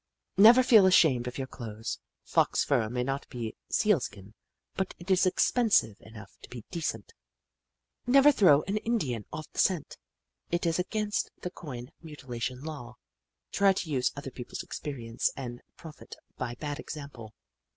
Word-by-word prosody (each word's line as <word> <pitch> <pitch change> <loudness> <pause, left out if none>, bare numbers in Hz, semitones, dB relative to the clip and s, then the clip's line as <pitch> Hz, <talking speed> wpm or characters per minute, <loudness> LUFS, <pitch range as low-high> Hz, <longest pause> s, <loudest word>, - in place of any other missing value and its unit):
" - - -57
Never 230 +6 +8
feel 220 -6 +7
ashamed 145 -9 +4
of 125 - -5
your 135 - -3
clothes. 115 -4 -6 0.2
Fox - - +2
fur 120 -6 +1
may 125 +1 -2
not 135 +2 -4
be 115 -3 -5
Sealskin, 120 - 0 0.4
but 190 -1 -3
it 175 +3 -5
is 185 0 +4
expensive 200 - +2
enough 110 -3 -12
to - - -13
be 120 -3 -9
decent. 170 - -4 0.5
" - - -58
Never 275 +3 +7
throw 165 - +5
an 200 +3 -2
Indian 175 - -2
off 155 -1 -6
the - - -7
scent. 180 -6 +1 0.5
It 170 +1 -1
is 165 +1 +1
against 210 +3 -1
the 180 - -4
coin 130 -7 -8
mutilation 130 -5 -6
law. 140 -6 -7 0.3
" - - -59
Try 200 -1 +4
to 185 -3 -4
use 125 -3 +1
other 140 -2 -7
people's 125 -1 -7
experience 120 -6 -3
and 120 -3 -6 0.2
profit 155 -3 -11 0.2
by 120 -1 -4
bad 145 +3 -5
example. 130 -7 -9
145 Hz, 160 wpm, -29 LUFS, 120-185 Hz, 0.5 s, Never